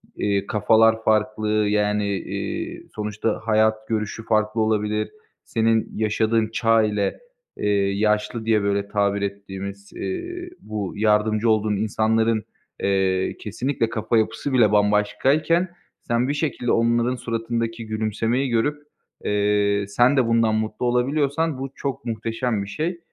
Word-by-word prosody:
eee, 100 -1 0
kafalar 110 +2 +3
farklı, 110 0 +1 0.2
yani, 105 0 +1
iii, - - -5
sonuçta 105 +1 -2
hayat 110 0 +2
görüşü 110 0 -3
farklı 110 +1 +1
olabilir. 105 0 0 0.3
Senin 115 0 +1
yaşadığın 110 +1 +1
çağ 115 -1 +3
ile, 105 -2 -1 0.4
eee, 105 - -1 0.2
yaşlı 105 +2 0
diye, 110 -2 +3
böyle, 100 0 0
tabir 100 -1 0
ettiğimiz, 100 0 -6
eee, 355 -1 -5
bu 105 -3 -5
yardımcı 110 +1 +2
olduğun 110 -1 +2
insanların, 110 +1 +1 0.4
eee, 95 -1 +1
kesinlikle 115 +2 -2
kafa 115 0 0
yapısı 120 +5 -1
bile 115 -5 +5
bambaşkayken, 130 - +2 0.3
sen 120 +2 0
bir 140 - 0
şekilde 145 -5 -1
onların 120 +2 +2
suratındaki 115 -1 -3
gülümsemeyi 110 +4 -1
görüp, 145 +6 0 0.4
eee, 100 0 +1
sen 120 +7 +3
de 125 - +3
bundan 115 -1 +3
mutlu 110 +2 -2
olabiliyorsan 140 +5 +1
bu 135 0 -5
çok 135 -3 -4
muhteşem 115 -1 -2
bir 100 - -8
şey. 170 - -3
110 Hz, 125 wpm, -23 LUFS, 105-120 Hz, 0.4 s, bile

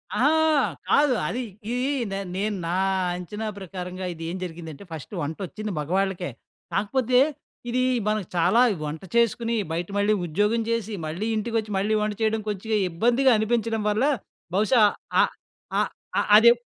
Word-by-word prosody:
అహా! 280 +4 +4 0.6
కాదు. 285 -3 +5
అది 250 +8 -2 0.3
ఇది 250 +2 0 0.2
నేన్ 195 -2 -4
నేను 205 0 -1
నా 175 - -1 0.4
అంచనా 210 +5 -5
ప్రకారంగా 185 0 -6
ఇది 165 0 -9
ఏం 185 - -4
జరిగిందంటే 165 -1 -7
ఫస్ట్ 160 +5 -8
వంటొచ్చింది 195 +7 -4
మగవాళ్ళకే. 185 +1 -1 0.4
కాకపోతే 250 +5 +2 0.5
ఇది 255 +1 +1 0.3
మనకి 215 -4 0
చాలా 225 +8 +4 0.2
వంట 150 +1 -4
చేసుకుని 235 0 +2 0.2
బయట 170 +1 -2
మళ్ళీ 205 +1 +3
ఉద్యోగం 210 +8 +1
చేసి, 225 -2 -1
మళ్ళీ 175 +8 -3
ఇంటికొచ్చి, 220 -1 -1
మళ్ళీ 210 +3 +1
వంట 210 0 0
చేయడం 220 0 +1
కొంచగా 210 +2 -1
ఇబ్బందిగా 240 +9 +3
అనిపించడం 225 0 0
వల్ల 215 +4 +1 0.5
బహుశా 215 +3 +4 0.4
ఆహ్, - - -1 0.5
ఆహ్, - - +1 0.3
ఆహ్, - - 0
అదే 235 +2 +8
210 Hz, 140 wpm, -25 LUFS, 180-230 Hz, 0.6 s, అదే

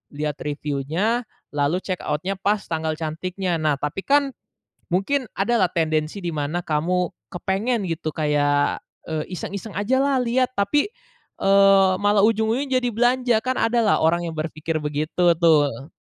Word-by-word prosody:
lihat 150 0 -2
review-nya, 150 - -1 0.3
lalu 145 +4 +1
check 185 -2 -4
out-nya 180 +7 -2
pas 205 +2 +1
tanggal 160 -1 -2
cantiknya, 175 +3 -2
nah 155 -2 +2
tapi 145 +6 -3
kan, 280 -1 +2 0.6
mungkin 255 +9 +1
ada 220 +5 0
lah 180 - +2
tendensi 155 +2 0
di 175 - -2
mana 150 +4 -2
kamu 175 +3 0 0.3
kepengen 195 +4 -1
gitu, 160 -1 -3
kayak, 145 -2 +1 0.3
eee, 155 -1 -2
iseng-iseng 200 +4 -6
ajalah 260 +5 +2
lihat, 250 +1 +1
tapi, 290 - +1 0.5
eee, 195 -1 +5
malah 205 0 +4
ujung-ujungnya 230 +5 +1
jadi 245 - +1
belanja, 245 +1 +2
kan 255 +2 -1
ada 230 +1 +2
lah 220 -3 +3
orang 170 +2 +2
yang 165 - -6
berpikir 155 +1 -3
begitu 150 +4 -2 0.2
tuh. 145 -4 +2
180 Hz, 145 wpm, -23 LUFS, 155-225 Hz, 0.6 s, eee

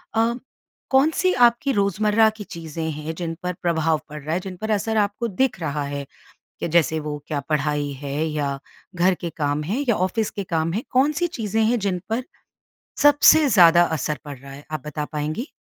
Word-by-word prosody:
अ, 225 +1 +3 0.6
कौन-सी 310 +7 +3
आपकी 240 +4 -1
रोज़मर्रा 210 +2 +3
की 210 - -6
चीज़ें 165 -3 -6
हैं 155 +2 -5
जिन 165 -2 -4
पर 180 0 -1
प्रभाव 160 -2 +1
पड़ 150 0 -8
रहा 155 +2 -2
है? 175 - +1
जिन 185 0 -7
पर 220 +3 -3
असर 220 +1 0
आपको 205 +3 0
दिख 240 +2 0
रहा 145 -2 -2
है? 140 0 -4 0.6
कि - - -2
जैसे 160 -1 +2
वो 150 -1 -4
क्या 150 -2 -2
पढ़ाई 150 -1 0
है 140 -1 -4
या 145 -3 -2 0.4
घर 180 +2 +3
के 170 - -4
काम 145 0 0
हैं 225 - -1
या 235 - +4
ऑफिस 190 +4 0
के 200 - -5
काम 165 -2 -1
हैं, 220 - -1
कौन-सी 295 +7 +2
चीज़ें 225 - -1
हैं 235 +2 +2
जिन 195 -3 -1
पर 235 +3 -1 0.8
सबसे 290 +1 +6
ज़्यादा 175 -5 +7
असर 150 +2 -2
पड़ 145 -2 -7
रहा 135 +2 -12
है, 140 +2 -11
आप 155 -4 -4
बता 150 0 -3
पाएँगी? 155 - -3
175 Hz, 190 wpm, -23 LUFS, 150-220 Hz, 0.8 s, ज़्यादा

